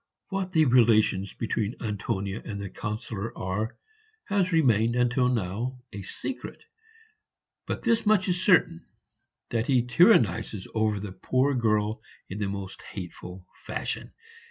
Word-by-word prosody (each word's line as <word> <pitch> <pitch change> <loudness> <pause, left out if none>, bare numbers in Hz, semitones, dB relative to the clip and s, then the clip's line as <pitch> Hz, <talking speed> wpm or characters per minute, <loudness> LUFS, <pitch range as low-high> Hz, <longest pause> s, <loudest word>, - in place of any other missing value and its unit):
What 195 -1 -2
the 160 -3 +4
relations 110 -6 +4
between 110 0 -2
Antonia 100 -2 -3
and 100 -3 -5
the 100 -2 -6
Councillor 110 +1 -5
are 100 +5 -3 0.5
has 195 -2 +1
remained 120 - +3
until 125 +1 +2
now 115 +3 -2 0.2
a 100 - -6
secret, 245 - -6 1.0
but - - -3
this 230 -1 +2
much 210 -3 +3
is 180 0 0
certain, 180 - +4 0.7
that 115 0 0
he 130 -4 +3
tyrannizes 125 - +3
over 110 -2 +1
the 100 -1 -6
poor 130 +9 +1
girl 110 -3 +1 0.3
in 100 - -4
the 100 -2 -1
most 100 -1 -6
hateful 90 -1 -9 0.2
fashion. - - -3
115 Hz, 130 wpm, -27 LUFS, 100-130 Hz, 1.0 s, the